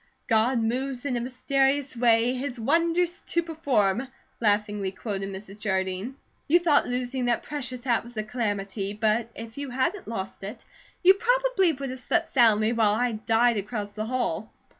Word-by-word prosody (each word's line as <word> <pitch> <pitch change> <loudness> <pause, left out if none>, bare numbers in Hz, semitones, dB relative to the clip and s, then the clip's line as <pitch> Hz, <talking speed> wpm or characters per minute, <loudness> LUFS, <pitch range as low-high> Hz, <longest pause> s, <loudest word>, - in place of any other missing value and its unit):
"'God 230 +3 +2
moves 250 +3 -2
in 265 -3 0
a 240 - -1
mysterious 270 +2 0
way, 235 0 +3
His 255 -1 -4
wonders 335 - +1
to 340 - +1
perform,'" 265 - 0 0.3
laughingly 210 -2 +1
quoted 195 -1 -4
Mrs. 195 +1 -9
Jardine. 190 +3 -2 0.3
"You 330 - +6
thought 330 -5 +3
losing 250 +1 -2
that 240 -1 +1
precious 260 -4 -5
hat 240 -3 +1
was 235 0 -13
a 215 - 0
calamity; 205 -3 -2
but 220 +2 +1
if 230 +3 -8
you 285 -1 -4
hadn't 300 +10 -1
lost 195 -4 -5
it, 210 +4 -8 0.4
you 375 +2 +9
probably 470 -4 +2
would 275 -1 -5
have 260 - -6
slept 335 +6 +1
soundly 225 -3 +4
while 215 -3 +3
I 245 +2 +1
died 225 +2 +2
across 205 0 -4
the 215 +1 -4
hall. 225 -5 -2
240 Hz, 165 wpm, -26 LUFS, 215-275 Hz, 0.4 s, you